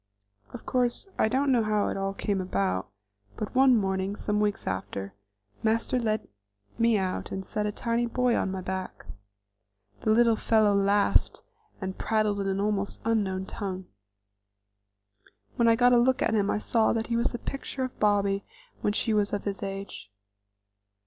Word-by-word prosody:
Of - - -9
course, 250 +7 0
I - - +4
don't 270 +4 +1
know 245 -3 +4
how 215 -1 +1
it - - -3
all 195 0 -2
came 200 -2 -1
about, 95 - -1 0.5
but 215 - -4
one 260 -1 +5
morning, 190 -1 -1
some 210 0 -1
weeks 210 -1 0
after, 95 +1 -4 0.5
Master 230 +3 +1
led 220 -2 -1 0.5
me 230 -1 +4
out 185 -2 -3
and 190 0 -4
set 210 +2 -2
a - - -1
tiny 235 +2 -1
boy 250 0 +1
on - - 0
my 190 0 -4
back. 190 0 -5 0.9
The - - -2
little 230 +1 +5
fellow 215 -1 +3
laughed 200 +1 +2 0.4
and 190 -1 -5
prattled 215 -2 +1
in 195 - -1
an 195 0 -1
almost 200 -1 -1
unknown 195 -4 0
tongue. 190 -2 -5 1.7
When 235 - +3
I 230 - +6
got 245 +1 +4
a 240 - +6
look 255 +1 +2
at 225 - +1
him 205 -2 +2
I - - +1
saw 220 +1 +2
that 225 -1 -1
he 235 - -2
was 235 - +2
the 240 - -4
picture 270 +1 -5
of 255 - -6
Bobby 200 -1 +2 0.4
when 205 - 0
she 225 +1 0
was 210 -1 +1
of 205 - -1
his 200 -1 -4
age. 195 - -6
210 Hz, 175 wpm, -27 LUFS, 195-230 Hz, 1.7 s, I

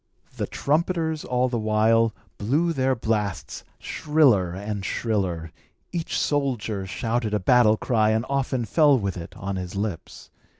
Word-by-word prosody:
The - - -3
trumpeters, 160 +1 0
all 125 0 +1
the 120 -2 -2
while, 110 +1 +3 0.3
blew 150 +11 +1
their 130 -2 +1
blasts 105 -5 -2
shriller 135 - +2
and 100 +2 -4
shriller; 95 -8 -2 0.4
each 170 -2 -2
soldier 120 -9 -1
shouted 115 +2 -1
a - - +1
battle 110 +1 +4
cry 110 -3 +2
and 110 +2 +1
often 135 -3 -1
fell 145 - +4
with 100 -5 -2
it 85 -2 -8
on 100 -1 -4
his 90 0 -5
lips. 100 -4 -5
115 Hz, 140 wpm, -24 LUFS, 100-135 Hz, 0.4 s, battle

